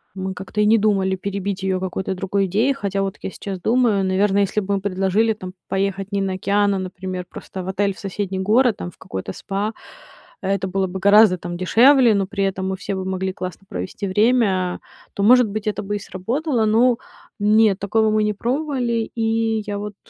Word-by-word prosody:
мы 190 0 -3
как-то 195 +3 -4
и 210 - +4
не 225 +2 +5
думали 195 -3 +1
перебить 200 0 -4
её 190 -1 0
какой-то 190 0 -3
другой 195 +1 -1
идеей, 220 +9 +2
хотя 200 -5 -2
вот 195 +1 -3
я - - -4
сейчас 190 -2 -6
думаю. 225 -2 +2
Наверное, 195 +2 +2
если 200 +2 0
б 200 0 -3
мы 195 - -1
предложили 195 +3 +1
там 185 -4 -8 0.2
поехать 195 +1 -2
не 200 - 0
на 195 -1 -1
океан, 200 +2 +1
а, - - -1
например, 185 0 -5
просто 190 - -8
в 185 - -7
отель 200 +1 0
в - - -18
соседний 195 -1 -4
город, 220 +3 +3
там 175 - -5
в - - -24
какой-то 95 0 -6
спа, 200 - -3 0.7
это 195 -1 -1
было 190 +1 0
бы 185 +1 -6
гораздо 200 -1 +6
там 175 0 -6
дешевле, 240 +5 +5
но 195 -1 +1
при 200 0 -2
этом 190 -1 -2
мы 190 - -2
все 200 +1 -4
бы 190 -1 -3
могли 190 0 -2
классно 185 +1 -7
провести 95 - -5
время, 200 -3 +2 0.3
то, 200 - -2
может 245 +2 +6
быть, 210 +1 -5
это 210 -1 -1
бы 205 +1 -3
и - - -5
сработало, 235 - -1
но 230 +3 +3 0.4
нет, 210 -1 +4
такого 215 +2 +2
мы 215 0 +2
не 210 - 0
пробовали, 245 -1 -1
и 225 -1 0
я 205 -1 -3
вот 210 0 -6
200 Hz, 205 wpm, -21 LUFS, 190-215 Hz, 0.7 s, гораздо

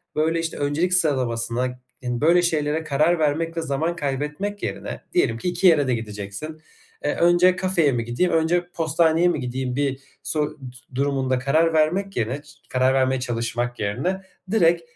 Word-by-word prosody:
böyle, 160 +2 +1
işte, 165 -1 -3
öncelik 150 +6 0
sıralamasına 125 -6 0 0.3
ın 120 -1 -2
böyle 170 +3 +5
şeylere 160 -2 0
karar 155 +3 +2
vermek 160 +2 0
ve - - +1
zaman 160 +3 -1
kaybetmek 150 +8 -3
yerine, - - -4
diyelim 355 - +2
ki 150 - -2
2 180 +2 +2
yere 150 -5 +5
de 125 - +2
gideceksin, 105 +8 -7 0.4
eee, - - 0
önce 175 +1 +4
kafeye 185 -5 +2
mi 120 -2 -1
gideyim, 120 +10 0
önce 175 +2 +1
postaneye 165 +1 +2
mi 175 - +1
gideyim 125 0 -3
bir 140 -1 -1 0.2
so 155 - -1
ııı, 150 0 -3 0.4
durumunda 135 -1 0
karar 160 +6 +2
vermek 180 +6 +1
yerine 120 +5 -1
ç 145 - -19 0.2
karar 130 +1 +2
vermeye 130 0 +2
çalışmak 120 0 -2
yerine, 130 - -1 0.3
direkt, 170 -5 +4
150 Hz, 165 wpm, -23 LUFS, 130-170 Hz, 0.4 s, böyle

